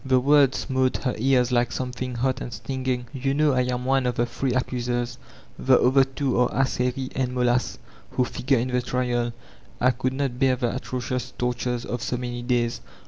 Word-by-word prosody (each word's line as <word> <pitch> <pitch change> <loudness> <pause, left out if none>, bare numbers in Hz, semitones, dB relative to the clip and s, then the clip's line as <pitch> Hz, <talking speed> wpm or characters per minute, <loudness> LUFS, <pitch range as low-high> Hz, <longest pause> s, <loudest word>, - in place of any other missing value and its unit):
The 130 -1 +3
words 140 0 +4
smote 130 -2 0
her 125 - 0
ears 125 0 +3
like 120 -1 +2
something 125 0 -4
hot 130 +2 0
and 120 - -5
stinging: 125 +2 -3
'^ou 135 +1 0
know 150 -1 +3
I 130 - +3
am 125 0 -2
one 135 -1 +2
of 125 - -1
the 120 - +1
three 130 +2 -2
accusers 120 -1 -1 0.4
(tHe 130 -1 +6
cyAcr 135 +1 +3
two 135 -4 0
are 125 - +4
Ascheri 130 0 -1
and 130 -1 -1
Molas) 125 0 +1 0.3
who 125 - +1
figure 130 +2 0
in 120 +2 -1
the 125 0 +1
triaL 120 -1 -1 0.5
I 125 - +4
could 130 +1 -2
not 135 -3 -2
bear 135 -2 +4
the 125 -1 -1
atrocious 125 -1 -4
torttu'es 125 0 -1
of 120 - -4
so 125 0 -2
many 120 0 -4
days. 120 -1 0
125 Hz, 195 wpm, -25 LUFS, 120-130 Hz, 0.5 s, tHe